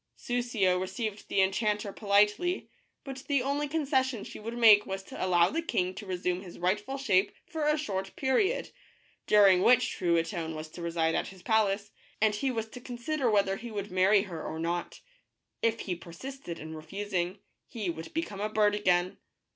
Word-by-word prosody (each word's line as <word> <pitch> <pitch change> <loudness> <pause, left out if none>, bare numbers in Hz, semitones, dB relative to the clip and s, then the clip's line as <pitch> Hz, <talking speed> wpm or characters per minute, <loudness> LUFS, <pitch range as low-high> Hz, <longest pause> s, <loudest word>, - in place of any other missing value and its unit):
Soussio 235 -7 0
received 205 +3 -4
the 195 - +3
enchanter 205 +1 0
politely, 210 - +2 0.3
but 270 -1 -7
the 280 -3 +2
only 285 +2 -1
concession 265 -6 0
she - - -9
would 230 +2 -6
make 215 -3 +8
was 195 0 -4
to - - -6
allow 175 -2 +4
the 330 - -1
king 185 - -1
to 205 +1 -9
resume 180 0 -1
his 180 -3 -11
rightful 210 +9 -1
shape 205 -7 +2
for 320 -4 -2
a 300 0 +3
short 195 -9 -3
period, 290 - +1 0.6
during 195 -3 +6
which 250 +3 +4
Truitonne 170 -1 -1
was 155 0 -6
to 175 - -10
reside 165 -1 0
at - - 0
his 190 -2 -12
palace, 205 -2 +1 0.3
and 215 0 +3
he 235 +6 -1
was 225 -3 -2
to 250 - -10
consider 250 +2 -2
whether 200 -2 +2
he 235 +3 -8
would 205 -2 -5
marry 190 +2 +4
her 170 -6 -7
or 160 - -5
not. 170 +2 -3 0.6
If 230 0 +1
he 185 - -2
persisted 175 +4 -8
in 160 +1 -8
refusing, 180 +3 -3 0.3
he 210 -7 -3
would 165 0 -8
become 210 -12 -3
a 210 - -1
bird 210 -1 +3
again. 180 -3 +1
205 Hz, 180 wpm, -29 LUFS, 185-240 Hz, 0.6 s, make